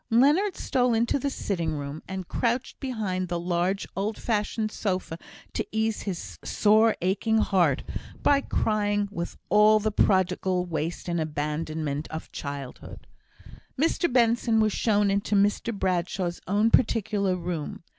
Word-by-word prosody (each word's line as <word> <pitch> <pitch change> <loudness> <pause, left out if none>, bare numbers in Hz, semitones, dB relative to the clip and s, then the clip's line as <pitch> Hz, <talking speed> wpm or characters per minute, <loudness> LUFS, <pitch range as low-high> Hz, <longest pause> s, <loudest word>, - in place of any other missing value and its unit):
Leonard 295 - +4
stole 250 -3 +1
into 235 +5 +1
the 280 - -1
sitting 170 - -2
room, 145 +2 -6
and 190 -2 -5
crouched 240 +2 -1
behind 210 -9 -2
the 175 0 -2
large 175 +3 0
old 205 +3 -2
fashioned 215 -1 -1
sofa 185 -6 -2 0.4
to - - -1
ease 220 0 0
his 95 - -6
sore, 220 +1 +4
aching 205 +5 +1
heart, 190 -5 +2 0.4
by 280 -1 +4
crying 205 -4 0
with 170 -4 -5
all 210 +1 +6
the 215 +1 -1
prodigal 185 -2 +2
waste 170 +1 -3
and 170 -1 0
abandonment 150 0 -3
of 160 0 -7
childhood. 140 -3 -7 0.7
Mr 330 +2 +1
Benson 235 -2 +3
was 215 -2 +2
shown 205 -3 +2
into 200 +1 0
Mr 205 +3 +2
Bradshaw's 180 -3 -1
own 210 +4 +2
particular 205 -5 +2
room. 170 -3 -5
200 Hz, 135 wpm, -26 LUFS, 175-220 Hz, 0.7 s, all